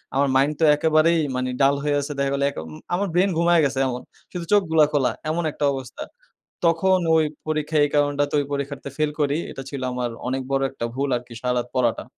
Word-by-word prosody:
আমার 140 +1 +3
মাইন্ড 140 +3 +3
তো - - +1
একেবারেই 160 +2 +3 0.2
মানে 130 0 -1
ডাল 140 +1 +5
হয়ে 145 -1 +1
আসে 145 +1 -5
দেখা 140 0 +1
গেল 140 - -1
এক - - -17
অ - - -8 0.3
আমার 200 +2 -1
ব্রেইন 185 +3 +3
ঘুমাইয়া 170 -1 +4
গেসে 135 -1 -1
এমন। 125 0 -4 0.3
শুধু 175 -2 -5
চোখগুলা 160 -6 +4
খোলা 135 -3 +2 0.2
এমন 170 +2 -1
একটা 145 - -2
অবস্থা। 130 -3 -7 0.6
তখন 185 +3 +3 0.2
ওই 160 - +4 0.2
পরীক্ষায় 155 -1 +1
এই 145 - -1
কারণটাতে 145 0 +1
ওই 145 - +1
পরীক্ষাতে 140 0 -4
ফেল 155 -1 +1
করি। 145 +1 +1
এটা 135 - -7
ছিল 140 -2 -5
আমার 125 -1 -2 0.2
অনেক 130 +1 -1
বড় 135 0 +1
একটা 125 -3 -6
ভুল 140 +1 -1
আরকি 120 0 -8
সারারাত 125 -1 0
পড়াটা। 120 -3 +1
145 Hz, 205 wpm, -23 LUFS, 135-160 Hz, 0.6 s, ডাল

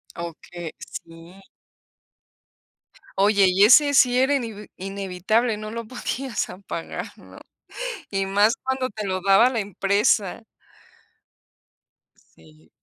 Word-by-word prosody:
Okey, 170 0 -8
sí. 165 +3 -11 1.8
Oye, 200 0 +4
y 185 +2 +4
ese 285 +5 +6
sí 250 -2 +5
era 270 +2 +3
inevi 225 -5 -5
inevitable, 195 +4 -1
no 215 0 -7
lo 230 0 -5
podías 255 +1 -4
apagar, 180 -3 -6
¿no? - - -15 0.7
Y 195 -1 -1
más 205 +4 +3
cuando 260 -1 -2
te 210 -1 -6
lo 185 0 -2
daba 200 +5 +5
la 245 -3 -2
empresa. 200 +1 0 1.9
Sí. 80 0 -21
200 Hz, 110 wpm, -23 LUFS, 185-235 Hz, 1.9 s, ese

